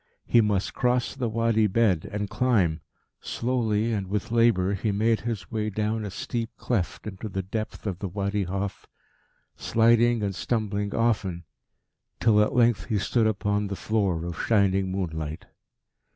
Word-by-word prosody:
He 120 - +5
must 105 -2 0
cross 125 0 +1
the 125 -4 -2
Wadi 115 -1 +2
bed 100 -5 +1
and 105 0 -2
climb. 105 -9 +1 0.4
Slowly 115 -2 0
and 100 -3 -2
with 105 +2 -3
labour 115 -5 +3
he 105 +2 -1
made 110 +2 +2
his 115 -2 -4
way 110 -1 -1
down 110 +1 -1
a - - -4
steep 115 +4 -3
cleft 105 -8 -2
into 105 +1 -6
the 95 -1 -3
depth 110 +4 -5
of 95 -4 -3
the 100 - -3
Wadi 100 +1 -1
Hof, 95 +2 -4 0.7
sliding 115 0 +3
and 100 -1 -1
stumbling 105 -1 -2
often, 100 -7 0 0.8
till 105 -2 +4
at 105 - +1
length 120 -5 +3
he 110 -4 0
stood 110 +3 +2
upon 105 -1 0
the 100 - -4
floor 95 -6 0
of 85 -1 -4
shining 95 -3 +2
moonlight. 80 -5 -4
105 Hz, 155 wpm, -26 LUFS, 95-115 Hz, 0.8 s, He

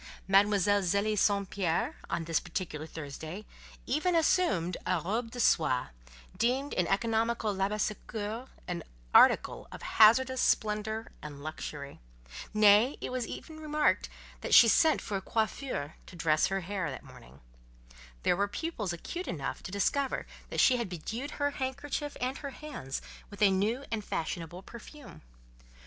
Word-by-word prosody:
Mademoiselle 205 0 +4
Zélie 200 +4 +1
St. 200 -1 +2
Pierre, 175 -5 0
on 165 - -1
this 165 -1 +1
particular 160 -5 -5
Thursday, 160 +6 -7 0.4
even 310 +7 +1
assumed 210 - +2
a 185 -2 +1
"robe 220 +8 -2
de 245 - -8
soie," 155 - +2 0.5
deemed 260 +5 0
in 180 - +1
economical 225 +1 +1
Labassecour 210 +3 -2 0.2
an 175 -1 -3 0.3
article - - +5
of - - -9
hazardous 260 +4 +5
splendour 220 +1 0
and 145 -2 -9
luxury; 150 -2 -6 0.5
nay, 215 +4 +5
it - - -5
was 250 -2 -2 0.2
remarked 305 -1 0 0.3
that - - +2
she 235 - +10
sent 315 +7 +4
for 205 - -3
a - - -5
"coiffeur" 220 - -2
to - - -12
dress 155 -2 +2
her 195 0 -1
hair 185 -2 -3
that 130 - -7
morning; 65 +3 -15 0.8
there - - +3
were 200 +2 +1
pupils 220 - -3
acute 340 - -5
enough 140 -5 -4
to - - -7
discover 265 +8 0 0.2
that - - -3
she 255 - +5
had 235 -5 -3
bedewed 225 - -5
her 285 0 +1
handkerchief 285 +2 -4
and 255 +2 -2
her 280 - -5
hands 265 - -6 0.3
with 205 - -11
a 200 - +6
new 215 +8 0
and 220 -2 -2
fashionable 170 +1 -4
perfume. 245 +6 -12
210 Hz, 145 wpm, -30 LUFS, 180-250 Hz, 0.8 s, she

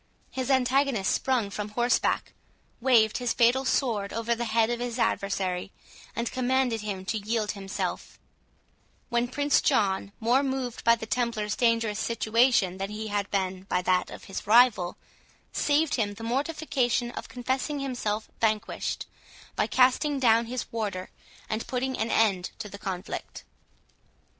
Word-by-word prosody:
His 260 -1 -3
antagonist 260 -4 +2
sprung 245 -6 0
from 210 +1 -4
horseback, 240 +3 +1 0.5
waved 235 -3 +4
his 245 -1 0
fatal 245 +3 +3
sword 220 -7 0
over 230 +1 0
the 235 0 -2
head 225 +1 +2
of 240 - -2
his 240 -1 -3
adversary, 195 -5 -1 0.4
and 235 0 -2
commanded 255 -3 +1
him 195 -3 -4
to 220 +3 -1
yield 215 0 -1
himself; 195 -1 -4 0.9
when 235 +1 +1
Prince 285 +3 +2
John, 195 0 +1
more 240 +4 +3
moved 265 -3 -3
by 230 0 +6
the 225 - -7
Templars 220 -2 -1
dangerous 230 -3 +1
situation 230 -4 +2
than 195 +1 -3
he 215 +1 -5
had 205 -1 -1
been 190 -1 -2
by 180 - 0
that 185 0 +2
of - - -10
his 195 +1 -7
rival, 215 -6 +5 0.5
saved 295 +1 +2
him 205 -4 0
the 225 - -9
mortification 255 -2 0
of - - -7
confessing 260 +4 -2
himself 230 -6 -2
vanquished, 220 -1 -1 0.5
by - - +1
casting 260 +3 +3
down 230 -2 +4
his 250 +1 -3
warder, 205 -5 -3 0.4
and 220 +1 -3
putting 260 +1 -1
an 225 0 -1
end 195 -5 +2
to 220 - -6
the 200 0 -10
conflict. 185 -1 -5
230 Hz, 150 wpm, -27 LUFS, 205-250 Hz, 0.9 s, by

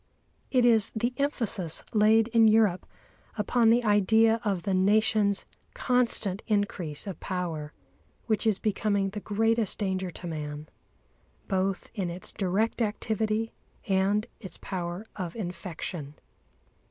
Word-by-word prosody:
It 250 -2 +3
is 225 -4 +4
the 235 +3 0
emphasis 230 - -2
laid 220 +1 +5
in 225 -1 +5
Europe 215 -4 +3 0.5
upon 225 +2 +3
the 240 +2 +4
idea 220 +2 +4
of 195 -5 -1
the 195 - 0
Nation's 205 +1 +3 0.3
constant 245 - +1
increase 200 -8 -1
of 195 -5 -6
power, 170 -5 -4 0.5
which 220 0 0
is 215 -3 +3
becoming 200 -2 0
the 210 - -5
greatest 225 +1 +1
danger 190 -2 -1
to 175 - -9
man, 150 -2 -5 0.8
both 190 -1 -1
in 195 -6 -2
its 175 +2 -7
direct 205 +5 0
activity 220 0 -1 0.4
and 200 +2 +2
its 190 - -8
power 180 +2 -5
of 175 -4 -4
infection. 175 -6 -6
205 Hz, 125 wpm, -28 LUFS, 185-225 Hz, 0.8 s, laid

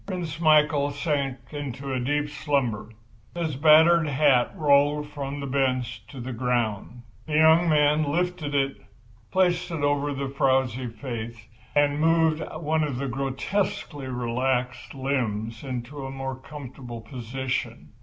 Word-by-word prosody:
Prince 170 -5 -4
Michael 150 -3 +4
sank 145 -2 -1
into 140 -2 -4
deep 145 +4 0
slumber. 140 -8 -1 0.5
His 165 -4 -2
battered 160 +3 +6
hat 135 -3 +3
rolled 145 0 +3
from 145 -1 -5
the 140 - -4
bench 130 -4 -1
to 135 +1 -10
the 125 +1 -5
ground. 120 -1 -2 0.2
The 150 - -2
young 160 +2 +5
man 150 0 +3
lifted 165 -1 -1
it, 135 -1 +1 0.5
placed 180 -1 +1
it 165 -4 -3
over 145 0 +1
the 140 -1 -3
frowsy 130 -2 +1
face 115 0 -6 0.4
and 145 0 +3
moved 160 -1 +3 0.2
one 155 0 +1
of 145 -5 -2
the 140 +2 -2
grotesquely 135 +2 -2
relaxed 125 +1 -2
limbs 115 -4 -2
into 130 +1 -5
a 135 - -5
more 135 0 -4
comfortable 130 -3 -9
position. 125 +3 -4
140 Hz, 135 wpm, -25 LUFS, 125-150 Hz, 0.5 s, battered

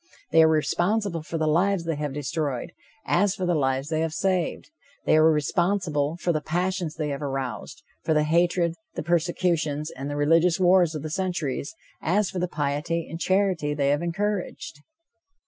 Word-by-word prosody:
They 165 - +6
are 160 - +7
responsible 175 +4 +1
for 165 +2 -5
the 160 - 0
lives 175 +4 +2
they 165 -1 -1
have 150 -1 -3
destroyed, 145 0 -3 0.3
as 200 -1 +2
for 185 - -3
the 175 - +2
lives 135 -1 0
they 155 -1 0
have 160 -1 -1
saved. 190 - -1 0.3
They - - +4
are 155 +1 +6
responsible 160 -1 0
for 175 - 0
the 155 - -1
passions 175 0 -2
they 155 -2 -2
have 140 0 -4
aroused, 135 -5 -4 0.2
for 160 - +1
the 150 - +3
hatred, 170 +2 +2 0.2
the - - -3
persecutions 165 -3 0
and 135 +2 -6
the 145 - -3
religious 165 +4 +3
wars 180 -3 +4
of 150 - -5
the 155 - -5
centuries, 175 -2 -2 0.3
as 195 +4 +1
for 185 - -3
the 180 - 0
piety 150 +2 -2
and 165 - -7
charity 185 -6 +1
they 140 -2 +1
have 145 +2 +2
encouraged. 180 -4 -3
165 Hz, 180 wpm, -25 LUFS, 150-180 Hz, 0.3 s, are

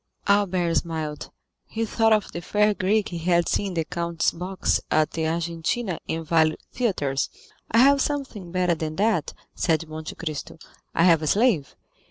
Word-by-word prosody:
Albert 190 -4 +2
smiled. 155 -3 -3 0.4
He 225 +1 -2
thought 225 +1 +2
of 215 -2 +2
the 170 - -5
fair 210 +4 +2
Greek 205 +2 +1
he 170 - -5
had 170 0 +2
seen 205 - 0
in 190 - -5
the 165 -1 0
count's 170 -1 -1
box 185 +2 -1
at 155 0 +2
the 160 -1 -1
Argentina 170 +5 -2
and 165 0 -2
Valle 160 -1 +3 0.2
theatres. 145 - 0 0.4
"I 230 - +1
have 275 +3 +6
something 265 -12 -3
better 180 -1 +2
than 155 -1 -4
that," 205 -5 0 0.2
said 165 -1 0
Monte 155 0 -7
Cristo; 155 -2 -5 0.4
"I 165 - +4
have 165 -3 +5
a 155 - -2
slave. 200 - +2
170 Hz, 170 wpm, -24 LUFS, 160-205 Hz, 0.4 s, have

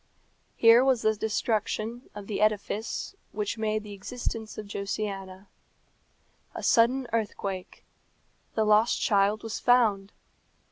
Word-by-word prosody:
Here 230 +2 +6
was 260 -3 +2
the 220 0 +3
destruction 220 +2 -2
of 205 -1 -7
the 210 0 -3
edifice 215 - -1 0.2
which 210 +1 -3
made 215 -1 -1
the 210 -1 -9
existence 220 +1 -5
of 215 - -6
Josiana. 200 -1 -5 1.1
A - - -6
sudden 250 +3 +3
earthquake. 200 -4 -3 0.7
The 220 - +2
lost 215 +2 +4
child 205 0 +2
was 225 -1 -4
found. 215 -5 +3
215 Hz, 120 wpm, -27 LUFS, 200-230 Hz, 1.1 s, Here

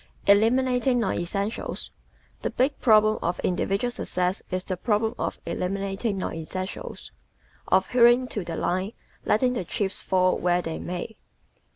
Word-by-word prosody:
Eliminating 245 +4 +4
Non 230 - +1
Essentials 200 +5 -3 0.5
¶ - - -35
The - - -1
big 270 +3 0
problem 215 -2 +5
of 175 +1 -1
individual 195 +6 0
success 180 -6 -2
is 185 0 -2
the 185 - -3
problem 220 +3 0
of - - -2
eliminating 195 +3 -2
non 190 - -3
essentials 185 +4 -6 0.6
of 190 0 +3
"hewing 245 +1 +5
to 205 - -3
the 170 -1 -5
line, 185 +6 -1 0.3
letting 250 +3 +3
the 235 - -2
chips 190 +2 -2
fall 185 -1 +2
where 175 0 +2
they 165 -1 -4
may." 180 +5 -5
200 Hz, 150 wpm, -26 LUFS, 185-235 Hz, 0.6 s, problem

